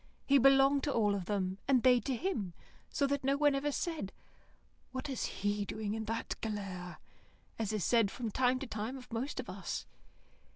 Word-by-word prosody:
He 280 0 +5
belonged 275 +1 +6
to 290 - +1
all 210 -5 +3
of 195 -3 -2
them, 190 -1 -1
and 260 -3 +4
they 250 -1 +6
to 255 +4 -2
him, 230 - -2 0.4
so 280 - +1
that 280 0 0
no 275 +1 +2
one 290 -1 +4
ever 280 +2 0
said 305 - -2 0.8
"What 260 +2 -4
is 265 - -2
he 205 +1 -1
doing 210 0 -3
in 220 0 -3
that 225 +1 -2
galère?" 195 -5 -4 0.6
as 220 -2 0
is 210 -4 -1
said 230 -4 +4
from 230 +1 -4
time 255 +3 +3
to 270 - -5
time 225 +2 -4
of 250 -2 -12
most 255 +5 -2
of - - -4
us. - - -4
235 Hz, 195 wpm, -33 LUFS, 205-275 Hz, 0.8 s, belonged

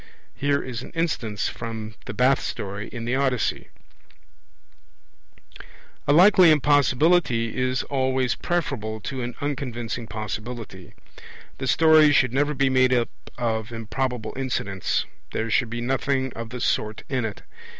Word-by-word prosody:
Here 140 0 0
is 120 -2 -5
an - - -9
instance, 125 -11 -1
from 110 -2 -6
the - - -5
Bath 130 +2 +4
story 100 +1 -5
in 115 -2 -7
the 120 - -1
Odyssey. 130 -3 0 2.4
A - - +4
likely 180 +2 +7
impossibility 145 -4 +3
is 130 0 0
always 130 -2 0
preferable 125 -11 -2
to 130 +4 -4
an 120 0 -4
unconvincing 125 -5 -3
possibility. 105 -2 -6 0.6
The - - -3
story 155 -2 +6
should 125 -3 +3
never 145 +2 +1
be 135 0 +2
made 130 -1 +4
up 120 -1 +1 0.3
of 115 -1 -2
improbable 120 +1 -3
incidents; 110 -8 -1 0.3
there 110 0 -2
should 120 0 +2
be 120 +1 -4
nothing 130 +1 0
of 115 0 -6
the 125 0 -6
sort 105 -2 -1
in 130 -3 -1
it. 110 -3 -5
125 Hz, 135 wpm, -24 LUFS, 115-140 Hz, 2.4 s, likely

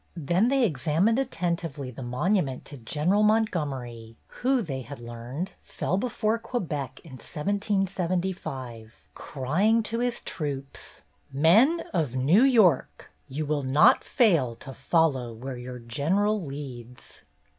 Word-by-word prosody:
Then 175 - +2
they 270 -1 +3
ex 140 - -3
amined 195 - +3
attentively 170 - -3
the 130 - -9
monument 135 +3 -1
to 145 - -9
General 155 - +1
Montgomery, 140 - -1 0.2
who, 255 -1 +2
they 135 -7 -4
had 135 +3 -9
learned, 120 +8 -6
fell 155 +2 -3
before 220 +1 0
Quebec, 155 - -4
in 160 - -13
1775, 175 - -3
crying 185 - +1
to 230 +2 -3
his 245 0 -1
troops: 140 - -6 0.3
"Men 215 - +4
of 155 -9 0
New 145 - +4
York, 220 - +3 0.2
you 150 +3 -4
will 150 0 0
not 135 +3 +5
fail 165 - +2
to 135 +3 -10
follow 130 -4 +1
where 130 +3 -6
your 125 0 -7
general 175 - 0
leads 130 -4 -9
155 Hz, 125 wpm, -26 LUFS, 130-200 Hz, 0.3 s, not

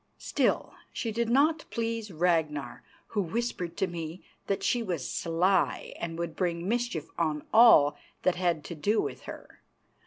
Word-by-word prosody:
Still, - - 0 0.2
she 230 - -3
did 230 +1 -1
not 300 +6 +3
please 230 -1 -2
Ragnar, 160 -6 0 0.3
who 210 - 0
whispered 180 -3 -3
to - - +2
me 170 -1 -6 0.2
that 195 - -1
she 240 - +2
was 175 - -3
sly 180 +3 +1
and 165 -1 -4
would 170 -1 -4
bring 175 -1 -1
mischief 235 -8 -1
on 155 -3 0
all 220 -11 +7 0.3
that 185 - +4
had 175 -4 0
to 170 - -6
do 200 +8 +1
with - - -3
her. - - -11
180 Hz, 155 wpm, -29 LUFS, 165-225 Hz, 0.3 s, all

